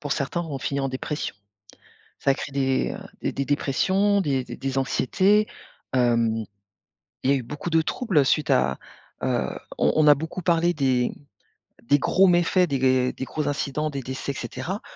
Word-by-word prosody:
pour 145 Hz, -2 st, -2 dB
certains, 155 Hz, +5 st, -2 dB
ont 150 Hz, -5 st, -5 dB
fini 140 Hz, +1 st, -2 dB
en 135 Hz, -, -1 dB
dépression. 140 Hz, +1 st, -4 dB, 0.8 s
Ça 135 Hz, -, +2 dB
a -, -, +3 dB
créé 140 Hz, -, -6 dB
des, 135 Hz, -1 st, 0 dB
heu -, -, -7 dB, 0.2 s
des -, -, -1 dB
des 140 Hz, -, -3 dB
dépressions, 190 Hz, +9 st, +2 dB
des 140 Hz, -8 st, 0 dB
des -, -, -9 dB
des 135 Hz, +1 st, -3 dB
anxiétés. 195 Hz, +10 st, +2 dB, 0.5 s
Hem, 115 Hz, -3 st, +2 dB, 0.8 s
il 130 Hz, -, +1 dB
y 140 Hz, -, +5 dB
a -, -, +3 dB
eu 130 Hz, -, -5 dB
beaucoup 150 Hz, +7 st, -6 dB
de 160 Hz, -1 st, +3 dB
troubles 185 Hz, -, +1 dB
suite 150 Hz, +3 st, +1 dB
à 65 Hz, +1 st, +2 dB, 0.4 s
heu, -, -, 0 dB, 0.3 s
on -, -, +2 dB
on 155 Hz, -1 st, +4 dB
a 145 Hz, -, +8 dB
beaucoup 160 Hz, +5 st, -5 dB
parlé 170 Hz, 0 st, +2 dB
des 130 Hz, -4 st, +1 dB, 0.7 s
des 145 Hz, +4 st, +3 dB
gros 190 Hz, +8 st, +4 dB
méfaits, 180 Hz, +1 st, +3 dB
des 140 Hz, -2 st, 0 dB
g 130 Hz, -1 st, +3 dB
des 130 Hz, -, -6 dB
gros 145 Hz, +1 st, -2 dB
incidents, 150 Hz, +1 st, -2 dB
des 140 Hz, -2 st, -4 dB
décès 130 Hz, +2 st, -4 dB
et 140 Hz, -, -8 dB
cetera, 130 Hz, -, -5 dB
140 Hz, 190 wpm, -24 LUFS, 130-165 Hz, 0.8 s, a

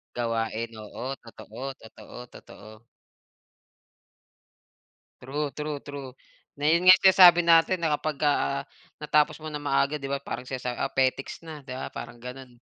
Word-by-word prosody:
Gawain, 115 Hz, -1 st, -2 dB
oo. 125 Hz, +5 st, -6 dB
Totoo, 115 Hz, +4 st, -9 dB
totoo, 110 Hz, -2 st, -14 dB
totoo. 110 Hz, +2 st, -15 dB, 2.4 s
True, 145 Hz, +3 st, -3 dB
true, 150 Hz, -1 st, -4 dB
true. 140 Hz, -2 st, -8 dB, 0.5 s
Na 145 Hz, +1 st, +1 dB
'yon 170 Hz, +3 st, +3 dB
nga 185 Hz, 0 st, +11 dB
sinasabi 180 Hz, -2 st, +8 dB
natin 170 Hz, +1 st, +4 dB
na 160 Hz, -2 st, +1 dB
kapag, 155 Hz, -1 st, -4 dB
ah, 70 Hz, -, +1 dB, 0.4 s
natapos 150 Hz, 0 st, +2 dB
mo 155 Hz, -, -6 dB
ng 150 Hz, -1 st, -6 dB
maaga 140 Hz, +1 st, +1 dB
'di 140 Hz, -2 st, -7 dB
ba 140 Hz, 0 st, -2 dB
parang 125 Hz, -2 st, -6 dB
sinasabi, 125 Hz, -1 st, -5 dB
ah, -, -, -2 dB
petiks 135 Hz, 0 st, -1 dB
na, 155 Hz, -2 st, -9 dB
'di 130 Hz, -, -7 dB
ba, 130 Hz, -, -5 dB
parang 120 Hz, -, -9 dB
gano'n. 125 Hz, +1 st, -9 dB
140 Hz, 145 wpm, -26 LUFS, 125-150 Hz, 2.4 s, nga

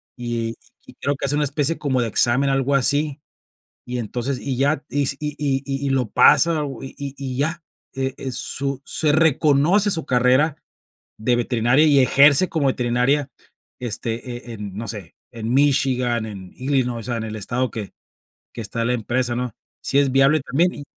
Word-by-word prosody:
y,-y 115 Hz, -2 st, -6 dB
creo 140 Hz, -, -1 dB
que 135 Hz, -, -4 dB
hacen 145 Hz, +2 st, +1 dB
una 150 Hz, -, +1 dB
especie 145 Hz, +3 st, 0 dB
como 130 Hz, -4 st, 0 dB
de 120 Hz, -, 0 dB
examen, 120 Hz, +5 st, +2 dB
algo 135 Hz, +1 st, +1 dB
así. 145 Hz, +2 st, +1 dB, 0.7 s
Y 125 Hz, 0 st, -4 dB
entonces 120 Hz, +4 st, -3 dB
y 135 Hz, -2 st, -3 dB
ya 140 Hz, +2 st, +1 dB
si 140 Hz, -1 st, +1 dB
y 150 Hz, -1 st, -4 dB
y 135 Hz, -2 st, 0 dB, 0.2 s
y -, -, -1 dB
lo 130 Hz, -5 st, 0 dB
pasa 165 Hz, -3 st, +5 dB, 0.2 s
y 135 Hz, +1 st, -7 dB
y 130 Hz, -2 st, -5 dB
ya. 160 Hz, +3 st, -1 dB, 0.3 s
Eh, 135 Hz, -1 st, -2 dB, 0.2 s
su 135 Hz, +2 st, -3 dB
se 150 Hz, -2 st, 0 dB
reconoce 160 Hz, +5 st, +3 dB
su 160 Hz, -2 st, -2 dB
carrera 130 Hz, +5 st, +3 dB, 0.6 s
de 120 Hz, +3 st, +1 dB
veterinaria 120 Hz, +4 st, +2 dB
y 145 Hz, -2 st, +5 dB
ejerce 140 Hz, +6 st, +5 dB
como 160 Hz, -6 st, -1 dB
veterinaria, 130 Hz, +3 st, +1 dB, 0.5 s
este, 120 Hz, +1 st, -4 dB, 0.2 s
eh -, -, -6 dB
eh, -, -, -7 dB
no 105 Hz, +2 st, -6 dB
sé, 100 Hz, -5 st, -7 dB, 0.2 s
en 115 Hz, 0 st, -4 dB
Michigan, 130 Hz, -4 st, +2 dB
en 95 Hz, -4 st, -9 dB
Illinois, 130 Hz, -3 st, -1 dB
o -, -, -8 dB
sea, 120 Hz, -, -1 dB
en 110 Hz, -, -4 dB
el 110 Hz, 0 st, -5 dB
estado 125 Hz, +4 st, -2 dB
que 105 Hz, -3 st, -6 dB, 0.6 s
que 115 Hz, -, -6 dB
está 115 Hz, +3 st, -3 dB
la 125 Hz, -, +1 dB
empresa, 120 Hz, +1 st, -1 dB
¿no? 125 Hz, -2 st, -3 dB, 0.3 s
Sí 140 Hz, -, +1 dB
es 140 Hz, -2 st, +2 dB
viable 135 Hz, +3 st, +4 dB
también, 165 Hz, +8 st, +1 dB
y 145 Hz, -, -9 dB
135 Hz, 175 wpm, -21 LUFS, 120-145 Hz, 0.7 s, pasa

